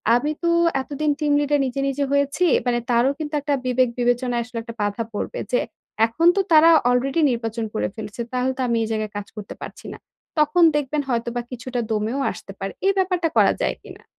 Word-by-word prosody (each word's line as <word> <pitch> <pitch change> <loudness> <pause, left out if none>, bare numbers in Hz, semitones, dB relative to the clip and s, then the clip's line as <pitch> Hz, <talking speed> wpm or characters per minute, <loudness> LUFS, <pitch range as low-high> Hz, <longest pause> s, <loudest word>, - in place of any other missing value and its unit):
আমি 295 +5 0
তো 340 - +2 0.3
এতদিন 295 +2 -1
team 295 -2 +1
leader 290 0 +1
নিজে, 260 +1 -3
নিজে 280 +1 -1
হয়েছি।" 280 +5 +1 0.2
মানে 240 -1 +1
তারও 240 +3 +3
কিন্তু 305 -1 -5
একটা 285 0 -1
বিবেক 255 0 +2
বিবেচনায় 245 0 +1
আসলে 240 0 -9
একটা 230 0 -9
বাধা 205 +3 -1
পড়বে - - -4
যে, - - +3 0.5
"এখন 320 +9 +1
তো - - +2
তারা 320 +1 +7 0.2
already 265 +6 +1
নির্বাচন 230 -1 -3
করে 215 - 0
ফেলেছে, 215 +1 -6
তাহলে 255 +1 0
তো 265 - -2
আমি 235 - +1
এই 220 - -2
জায়গায় 215 -1 -2
কাজ 205 - -6
করতে 210 -1 -8
পারছি - - -10
না।" - - -10 0.4
তখন 305 +4 +4
দেখবেন 295 0 0
হয়তোবা 235 0 -1
কিছুটা 250 0 -4
দমেও 220 +5 -1
আসতে - - -10
পারে। 195 0 -4
এই 395 - +4
ব্যাপারটা 365 -3 +1
করা - - +5
যায় - - 0
কিনা? - - -13
255 Hz, 200 wpm, -22 LUFS, 230-295 Hz, 0.5 s, তারা